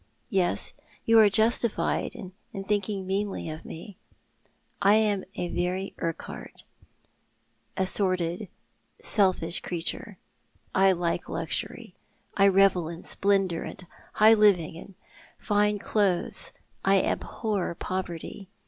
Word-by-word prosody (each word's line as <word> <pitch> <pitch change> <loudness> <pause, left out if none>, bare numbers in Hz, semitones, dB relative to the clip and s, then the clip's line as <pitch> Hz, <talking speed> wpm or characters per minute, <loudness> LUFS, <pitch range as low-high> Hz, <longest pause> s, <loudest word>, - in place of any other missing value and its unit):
Yes, 185 -3 +2 0.3
you 225 0 +6
are 215 -2 +7
justified 220 +2 +1
in 185 0 -9 0.3
thinking 200 -1 -1
meanly 195 -3 -2
of 155 - -8
me. 175 +4 -10 0.8
I 200 +2 +6
am 210 -3 +2
a 175 - -3
very 180 +3 -2
Urquhart 165 -1 -6 0.6
— 115 0 -42
a 190 - +2
sordid, 185 -1 +1 0.5
selfish 185 -5 +1
creature. 180 +3 -4 0.6
I 195 0 +5
like 170 -1 -2
luxury. - - -4 0.4
I 200 0 +5
revel 190 -4 +4
in 170 0 -8
splendour 195 -4 +1
and 180 - -8 0.3
high 215 +1 +7
living 200 -8 +4
and 185 +3 -11 0.4
fine 210 0 +1
clothes. 195 -3 0 0.3
I 195 0 +4
abhor 205 -6 -2
poverty. 185 +1 -5
190 Hz, 110 wpm, -27 LUFS, 175-205 Hz, 0.8 s, are